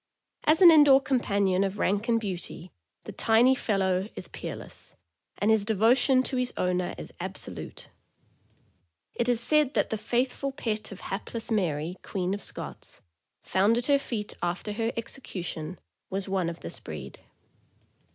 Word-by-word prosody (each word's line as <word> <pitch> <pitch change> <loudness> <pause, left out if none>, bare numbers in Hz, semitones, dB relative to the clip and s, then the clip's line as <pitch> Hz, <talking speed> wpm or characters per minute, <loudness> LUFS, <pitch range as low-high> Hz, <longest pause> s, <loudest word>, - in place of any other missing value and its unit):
As 320 +4 +4
an 345 - +11
in 310 -2 +8
door 270 -1 +7
companion 200 -8 +1
of 195 +1 -2
rank 205 +4 0
and 230 -1 +3
beauty 185 -3 -6 0.3
the - - -8
tiny 235 +3 +4
fellow 195 -5 0
is - - -5
peerless, - - -8 0.4
and 210 +2 +2
his 220 -2 +3
devotion 240 +5 +3
to 260 - -2
his 250 0 0
owner 180 0 -1
is - - -9
absolute. - - -6 1.3
It 240 +1 -1
is 240 -2 +2
said 300 +2 +5
that - - +1
the 220 - -2
faithful 255 +4 -1
pet 220 -7 -3
of 195 - -9
hapless 225 +4 -5
Mary, 175 -4 -1
Queen 185 -1 -2
of 205 - -4
Scots, - - -7 0.4
found 205 +5 +2
at 240 - 0
her 280 0 +4
feet 220 -6 -4
after 175 +4 -2
her 225 +2 -1
execution, 180 - -5 0.3
was 195 0 -3
one 190 -3 0
of 170 - -8
this - - -6
breed. 70 -4 -8
215 Hz, 155 wpm, -27 LUFS, 185-245 Hz, 1.3 s, an